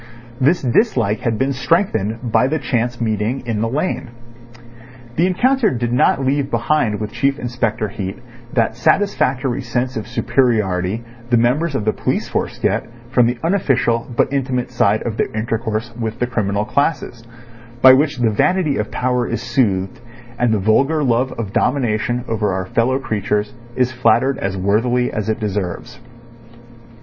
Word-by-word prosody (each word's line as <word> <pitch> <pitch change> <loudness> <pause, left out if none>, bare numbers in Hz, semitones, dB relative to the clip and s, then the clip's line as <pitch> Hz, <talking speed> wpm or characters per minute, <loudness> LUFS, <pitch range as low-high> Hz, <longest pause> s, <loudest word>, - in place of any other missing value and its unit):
This 145 +6 +2
dislike 120 - +2
had 115 -2 -1
been 135 +4 0
strengthened 125 - 0
by 125 - +4
the 155 +4 0
chance 120 -4 -1
meeting 110 +3 -1
in 110 -3 -2
the 115 - 0
lane. 130 -2 -2 1.1
The 170 +3 +3
encounter 250 +5 +2
did 120 -5 -2
not 135 +2 +2
leave 140 +1 0
behind 115 -3 +1
with 105 -1 -4
Chief 135 +4 0
Inspector 115 -4 -2
Heat 95 -1 -5 0.3
that 115 -2 +1
satisfactory 130 - +1
sense 125 +1 -2
of 110 - -4
superiority 110 -5 0 0.3
the 120 - +4
members 135 +7 +1
of 110 - -1
the 110 - +2
police - - -2
force - - -3
get - - 0 0.2
from 125 -3 +4
the 120 +1 -1
unofficial 135 -10 +1
but - - +2
intimate 130 -3 -1
side 110 -3 +2
of 115 -2 -4
their - - -1
intercourse 110 +1 -2
with 115 -1 -4
the 125 - 0
criminal 105 -4 -1
classes, 130 -1 -1 0.6
by 130 0 +10
which 145 +1 +2
the 120 -3 +2
vanity 155 - +1
of 105 +1 -2
power 125 -1 0
is 115 - -2
soothed, 95 -6 0 0.4
and 120 -2 +2
the 110 - +2
vulgar 135 +10 +2
love 125 0 +1
of 105 -4 -5
domination 120 -2 0
over 105 -3 0
our 95 0 -2
fellow 120 +6 +1
creatures 105 -4 -2 0.2
is 125 0 +1
flattered 130 +1 +2
as 95 0 -2
worthily 115 +6 +1
as 110 0 -2
it 110 - -1
deserves. 105 +2 -4
120 Hz, 160 wpm, -19 LUFS, 110-130 Hz, 1.1 s, by